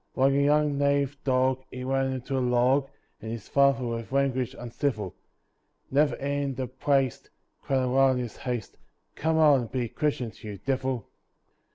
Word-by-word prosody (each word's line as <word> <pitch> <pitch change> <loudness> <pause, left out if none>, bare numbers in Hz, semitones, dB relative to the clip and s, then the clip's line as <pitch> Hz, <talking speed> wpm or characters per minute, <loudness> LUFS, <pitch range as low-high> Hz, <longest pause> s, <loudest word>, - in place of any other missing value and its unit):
Like 135 +1 +3
a 140 - +3
young 145 0 +2
native 140 0 +2
dog 130 0 +2
he 125 0 -7
ran 135 0 0
into 130 +1 -4
a - - +1
log, 125 +3 +2 0.3
And 110 - -6
his 115 -3 -6
father 140 -2 +3
with 115 0 -4
language 130 -2 0
uncivil, 115 - -3 0.8
Never 145 +2 +3
heeding 140 -1 -2
the 130 - -2
"praste" 135 +1 0 0.3
cried 135 -1 0
aloud 130 +1 +4
in 125 - -1
his 120 - -8
haste, 120 -5 -4 0.4
"Come 160 +1 0
out 150 -4 +6
and 120 -3 -5
be 125 -2 -1
christened, 130 -6 -2
you 105 -2 -6
divil!" 130 -1 -2
130 Hz, 165 wpm, -27 LUFS, 125-140 Hz, 0.8 s, out